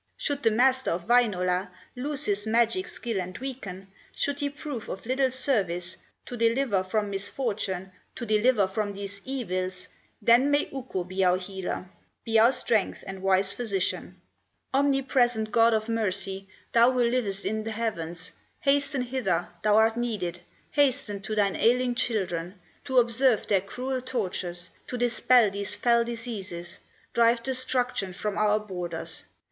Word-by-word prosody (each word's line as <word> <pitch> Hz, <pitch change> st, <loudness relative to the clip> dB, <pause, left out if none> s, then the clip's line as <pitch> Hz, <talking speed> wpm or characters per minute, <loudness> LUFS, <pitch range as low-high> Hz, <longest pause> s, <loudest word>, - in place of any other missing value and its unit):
Should 285 Hz, -1 st, -2 dB
the 225 Hz, -, +4 dB
Master 260 Hz, +4 st, +3 dB
of 170 Hz, +1 st, -2 dB
Wainola 190 Hz, -6 st, +2 dB, 0.3 s
Lose 285 Hz, +3 st, -1 dB
his 205 Hz, +1 st, 0 dB
magic 235 Hz, +12 st, +2 dB
skill 230 Hz, -6 st, -3 dB
and 185 Hz, +1 st, -7 dB
weaken, 200 Hz, -8 st, -7 dB, 0.3 s
Should 285 Hz, 0 st, -1 dB
he 285 Hz, -, 0 dB
prove 285 Hz, -5 st, -7 dB
of 195 Hz, -, -6 dB
little 260 Hz, +2 st, +2 dB
service 190 Hz, -9 st, -1 dB, 0.3 s
To 245 Hz, -, -6 dB
deliver 230 Hz, -3 st, +2 dB
from 205 Hz, +2 st, -1 dB
misfortune, 195 Hz, -2 st, -3 dB, 0.2 s
To 240 Hz, -, -5 dB
deliver 215 Hz, 0 st, +3 dB
from 205 Hz, +2 st, -2 dB
these 200 Hz, 0 st, -7 dB
evils, 185 Hz, -8 st, -3 dB, 0.3 s
Then 235 Hz, +6 st, +5 dB
may 290 Hz, 0 st, +2 dB
Ukko 255 Hz, -9 st, -4 dB
be 185 Hz, +2 st, -2 dB
our 180 Hz, 0 st, +4 dB
healer, 185 Hz, -1 st, -5 dB, 0.4 s
Be 225 Hz, -1 st, +3 dB
our 230 Hz, +3 st, +7 dB
strength 230 Hz, -5 st, 0 dB
and 190 Hz, 0 st, -7 dB
wise 190 Hz, 0 st, +3 dB
Physician. 200 Hz, -6 st, -2 dB, 0.5 s
"Omnipresent 260 Hz, -5 st, +2 dB
God 230 Hz, -1 st, +5 dB
of 220 Hz, 0 st, -1 dB
mercy, 195 Hz, -3 st, -1 dB, 0.2 s
Thou 235 Hz, +2 st, +5 dB
who 250 Hz, -1 st, +2 dB
livest 235 Hz, -5 st, 0 dB
in 220 Hz, +1 st, -1 dB
the 225 Hz, -, -4 dB
heavens, 180 Hz, -6 st, -3 dB, 0.3 s
Hasten 280 Hz, -1 st, +2 dB
hither, 250 Hz, -6 st, -1 dB
thou 210 Hz, 0 st, +4 dB
art 225 Hz, +1 st, +4 dB
needed, 205 Hz, -8 st, -2 dB, 0.3 s
Hasten 260 Hz, -8 st, +1 dB
to 215 Hz, +2 st, -4 dB
thine 200 Hz, -2 st, +2 dB
ailing 245 Hz, +2 st, +3 dB
children, 190 Hz, -7 st, -1 dB, 0.3 s
To 260 Hz, -, -1 dB
observe 240 Hz, -1 st, +4 dB
their 195 Hz, -2 st, +2 dB
cruel 255 Hz, +6 st, -4 dB
tortures, 180 Hz, -7 st, -4 dB, 0.2 s
To 250 Hz, -, -4 dB
dispel 240 Hz, -2 st, +4 dB
these 200 Hz, 0 st, -1 dB
fell 235 Hz, -1 st, +3 dB
diseases, 210 Hz, -7 st, -5 dB, 0.3 s
Drive 235 Hz, 0 st, +3 dB
destruction 255 Hz, -6 st, 0 dB
from 205 Hz, +2 st, -3 dB
our 210 Hz, 0 st, +3 dB
borders. 180 Hz, -5 st, -5 dB
220 Hz, 150 wpm, -27 LUFS, 195-250 Hz, 0.5 s, our